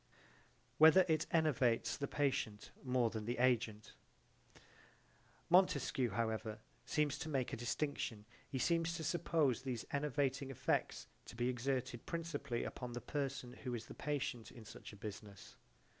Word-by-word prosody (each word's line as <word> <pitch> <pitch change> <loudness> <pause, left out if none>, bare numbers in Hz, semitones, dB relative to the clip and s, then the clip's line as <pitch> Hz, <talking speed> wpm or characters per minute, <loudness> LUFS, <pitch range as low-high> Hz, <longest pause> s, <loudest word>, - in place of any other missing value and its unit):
Whether 160 +4 +9
it 160 -1 +2
enervates 125 -8 +2
the 140 - -3
patient 135 -8 -1
more 125 -3 +2
than 110 -1 -4
the 120 +2 -2
agent 115 -4 +1 1.5
Montesquieu 140 -8 +4
however 110 -2 -1 0.3
seems 150 -2 +1
to 160 - -4
make 135 -4 -1
a - - +1
distinction 120 -3 -2 0.2
he 135 - -3
seems 165 +4 +1
to 165 - -4
suppose 155 -6 +1
these 125 -4 -3
enervating 140 -1 0
effects 135 - 0 0.2
to - - -10
be 120 +1 +1
exerted 125 -1 -2
principally 145 -7 -2
upon 125 -1 -5
the 120 - -3
person 135 -3 -3
who 125 -1 -4
is 115 - -5
the - - -9
patient 140 -6 -3
in 115 -2 -12
such - - -10
a - - -11
business. 105 -2 -8
130 Hz, 145 wpm, -38 LUFS, 115-145 Hz, 1.5 s, Whether